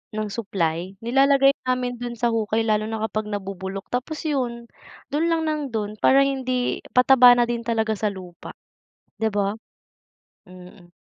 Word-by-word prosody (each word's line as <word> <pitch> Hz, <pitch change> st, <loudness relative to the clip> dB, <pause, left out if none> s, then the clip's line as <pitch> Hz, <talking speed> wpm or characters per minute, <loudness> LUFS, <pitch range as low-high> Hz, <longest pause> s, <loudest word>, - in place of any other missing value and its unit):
ng 215 Hz, -1 st, -3 dB
supply, 185 Hz, -4 st, -2 dB
nilalagay 275 Hz, +2 st, +4 dB, 0.2 s
namin 250 Hz, -1 st, -1 dB
dun 240 Hz, -1 st, -5 dB
sa 235 Hz, 0 st, 0 dB
hukay 225 Hz, 0 st, 0 dB
lalo 215 Hz, -1 st, 0 dB
na 220 Hz, 0 st, -4 dB
kapag 215 Hz, -1 st, -2 dB
nabubulok, 195 Hz, -1 st, -6 dB
tapos 260 Hz, +7 st, -3 dB
yun, 250 Hz, -6 st, -2 dB, 0.5 s
dun 315 Hz, +3 st, +1 dB
lang 330 Hz, -1 st, +1 dB
ng 310 Hz, -1 st, -1 dB
dun 215 Hz, -3 st, -4 dB
para 275 Hz, +1 st, +5 dB
hindi 255 Hz, -2 st, -1 dB, 0.2 s
pataba 250 Hz, -1 st, +7 dB
na 240 Hz, -, +3 dB
din 235 Hz, 0 st, -2 dB
talaga 225 Hz, -2 st, -1 dB
sa 215 Hz, 0 st, -1 dB
lupa, 185 Hz, -4 st, -8 dB, 0.6 s
'di 220 Hz, 0 st, -1 dB
ba? 200 Hz, 0 st, -1 dB, 0.9 s
Mm. 180 Hz, -1 st, -15 dB
225 Hz, 150 wpm, -23 LUFS, 205-255 Hz, 0.9 s, pataba